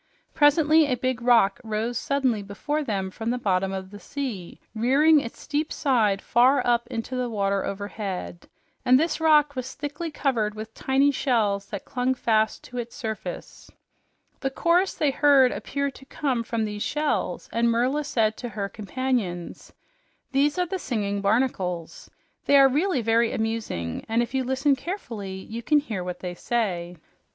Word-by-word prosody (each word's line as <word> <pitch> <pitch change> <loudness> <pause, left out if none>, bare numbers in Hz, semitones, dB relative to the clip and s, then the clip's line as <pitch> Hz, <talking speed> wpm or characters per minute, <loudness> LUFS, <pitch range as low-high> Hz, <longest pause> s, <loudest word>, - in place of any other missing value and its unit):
Presently 305 +1 +5
a 255 - +1
big 255 0 -1
rock 230 -5 +4
rose 220 +2 -2
suddenly 260 -3 0
before 290 +10 -3
them 195 -7 -2
from 225 +4 -4
the 245 - 0
bottom 195 -4 0
of 190 0 -6
the 205 - -10
sea, 240 -12 -6
rearing 275 +8 +4
its 235 -4 -7
steep 300 +2 -2
side 220 -8 +1
far 255 +4 +4
up 240 -1 +2
into 230 +3 -4
the 250 -1 -1
water 200 -3 0
overhead, 200 -3 -5 0.3
and 255 +1 +5
this 325 +1 0
rock 300 -2 +4
was 255 0 -5
thickly 295 +3 -5
covered 235 -8 -1
with 215 +1 -8
tiny 270 +4 +2
shells 215 -8 0
that 200 - -6
clung 255 +1 0
fast 220 -3 +1
to 250 -1 -7
its 235 0 -6
surface. 220 -6 -6 0.7
The 270 - -1
chorus 345 +7 +2
they 295 -2 +1
heard 270 -3 +5
appeared 280 0 -3
to 270 - -14
come 270 -3 -1
from 230 -1 -2
these 210 -1 -5
shells, 300 +5 -1
and 235 +1 +2
Merla 250 +6 +1
said 225 -6 +1
to 245 - -5
her 200 -2 -3
companions, 215 -6 -3 0.6
"These 285 +3 +2
are 360 - +2
the 375 +2 -4
singing 205 - -2
barnacles. 195 -6 -1 0.4
They 285 - +5
are 275 -1 +8
really 290 0 +1
very 230 +1 +3
amusing, 220 - -3
and 230 +2 +2
if 240 - -7
you 265 -1 +1
listen 265 +2 +2
carefully, 230 - -6
you 225 +4 -7
can 300 +5 +3
hear 220 -11 -2
what 180 0 -6
they 180 -1 -4
say." 180 -5 -2
240 Hz, 165 wpm, -25 LUFS, 210-280 Hz, 0.7 s, are